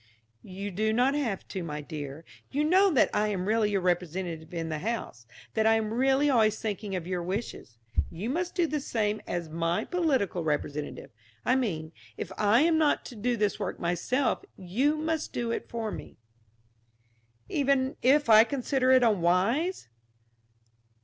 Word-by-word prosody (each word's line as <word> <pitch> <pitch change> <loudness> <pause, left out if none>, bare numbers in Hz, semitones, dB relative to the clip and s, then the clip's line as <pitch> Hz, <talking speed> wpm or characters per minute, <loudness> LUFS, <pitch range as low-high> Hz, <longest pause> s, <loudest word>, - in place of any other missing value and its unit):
"You 195 - -6
do 215 +4 0
not 250 +4 +3
have 250 -10 -2
to, 190 - -4
my 150 -3 -4
dear. 150 0 -7 0.2
You 290 +2 0
know 375 +6 +5
that 290 -9 +3
I 210 0 +2
am 190 -3 -2
really 220 -1 +2
your 200 -2 0
representative 175 -2 -2
in 165 -2 -4
the 155 -1 -3
house; 185 - -4 0.3
that 220 0 +2
I 225 - +5
am 220 -1 -1
really 270 +4 +3
always 225 -6 +3
thinking 205 -2 -3
of 175 -3 -4
your 180 -1 -2
wishes. 185 - -5 0.3
You 205 +9 -4
must 350 +4 -2
do 350 -2 +3
the 305 -1 -1
same 215 -5 -1
as 175 -2 -3
my 165 +2 -1
political 270 - 0
representative. 150 -1 -3 0.3
I 255 - +3
mean, 165 -12 -2 0.3
if - - -5
I 215 +4 +4
am 320 0 +3
not 300 -2 +2
to 245 - -9
do 235 +3 -1
this 210 -2 0
work - - -4
myself, 180 - 0
you 245 - 0
must 320 0 -2
do 235 -1 -2
it - - -4
for 225 -2 -3
me." - - -9 1.3
"Even 275 -1 +1
if 285 +3 +4
I 220 -1 +8
consider 260 0 0
it 260 -1 +6
unwise?" 215 - +2
215 Hz, 170 wpm, -28 LUFS, 180-265 Hz, 1.3 s, I